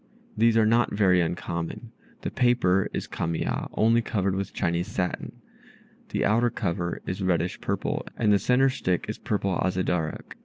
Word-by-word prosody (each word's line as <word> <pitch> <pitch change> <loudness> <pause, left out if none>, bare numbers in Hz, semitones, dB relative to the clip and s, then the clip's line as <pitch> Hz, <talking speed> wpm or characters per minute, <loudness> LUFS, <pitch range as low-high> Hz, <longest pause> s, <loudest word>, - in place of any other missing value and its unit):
These 115 +1 +4
are 110 - +5
not 115 +2 +3
very 95 -4 +4
uncommon. 85 0 -4 0.3
The - - -3
paper 120 -7 +2
is - - -3
Kamiya, 80 0 -2
only 115 +2 +3
covered 100 -4 -1
with 100 0 -3
Chinese 85 +1 -1
satin. 90 -1 -4 0.7
The - - 0
outer 115 +4 +3
cover 85 -6 -3
is 95 +2 -4
reddish 90 -2 0
purple, - - -2
and 105 -3 +3
the 100 - +4
centre 125 +6 +3
stick 90 -8 -1
is - - -5
purple 100 -2 -1
Azedarach. 90 -3 -1
95 Hz, 155 wpm, -26 LUFS, 90-115 Hz, 0.7 s, are